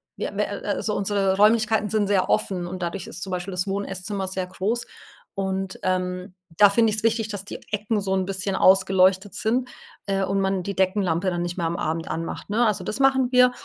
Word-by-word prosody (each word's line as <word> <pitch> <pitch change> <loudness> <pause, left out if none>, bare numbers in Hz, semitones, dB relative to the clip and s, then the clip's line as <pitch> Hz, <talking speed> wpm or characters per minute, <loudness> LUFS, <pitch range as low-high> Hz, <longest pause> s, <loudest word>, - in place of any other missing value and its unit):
wir - - -4
wir - - 0
äh, - - -6
also 210 - -2
unsere 195 -1 +1
Räumlichkeiten 215 0 +3
sind 215 -2 +1
sehr 195 -2 +2
offen 180 -3 0
und 185 +1 -6
dadurch 175 +3 -3
ist - - -6
zum 190 -1 -4
Beispiel 180 +1 -3
das 180 +1 -2
Wohn 200 +1 -2
Esszimmer 195 +1 -4
sehr 185 -1 -2
groß. 220 +6 -2 0.5
Und, 190 -1 -2
ähm, 185 0 -2 0.2
da 205 -1 +7
finde 225 +1 +3
ich's 215 +1 -2
wichtig, 225 -1 +1
dass 205 -2 -6
die - - -7
Ecken 210 0 -1
so 195 - -3
'n 190 - 0
bisschen 190 0 -2
ausgeleuchtet 190 +1 +4
sind, 245 +4 0 0.4
äh, 195 -1 0
und 195 +1 0
man 190 -1 0
die 200 +2 -4
Deckenlampe 185 -2 +1
dann 175 -1 -2
nicht 175 +1 -4
mehr 170 -2 0
am 170 - -2
Abend 160 +1 -2
anmacht, 165 +4 -5
ne? 230 +4 +2
Also 210 - 0
das 215 - -4
machen 265 -2 +3
wir. 250 0 +6
195 Hz, 215 wpm, -24 LUFS, 185-210 Hz, 0.5 s, da